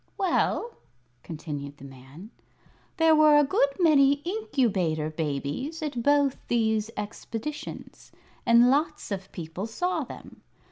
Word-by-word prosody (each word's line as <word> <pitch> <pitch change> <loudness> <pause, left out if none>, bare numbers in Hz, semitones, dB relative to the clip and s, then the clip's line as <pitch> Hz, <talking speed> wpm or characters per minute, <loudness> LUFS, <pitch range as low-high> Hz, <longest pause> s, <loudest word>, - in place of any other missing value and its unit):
"Well," 395 +5 0 0.4
continued 145 -3 -7
the 140 - -12
man, 135 - -13 0.7
"there 325 -2 +5
were 305 -1 +6
a 295 - +6
good 280 0 +2
many 285 -5 +5
Incubator 220 - 0
Babies 155 - -3
at 280 -6 -3
both 285 0 +3
those 220 -2 +1
expositions, 225 +7 -7 0.3
and 235 +2 +5
lots 300 -3 -1
of 190 -1 -5
people 175 +4 -6
saw 360 +11 -1
them. - - -12
235 Hz, 120 wpm, -26 LUFS, -, 0.7 s, were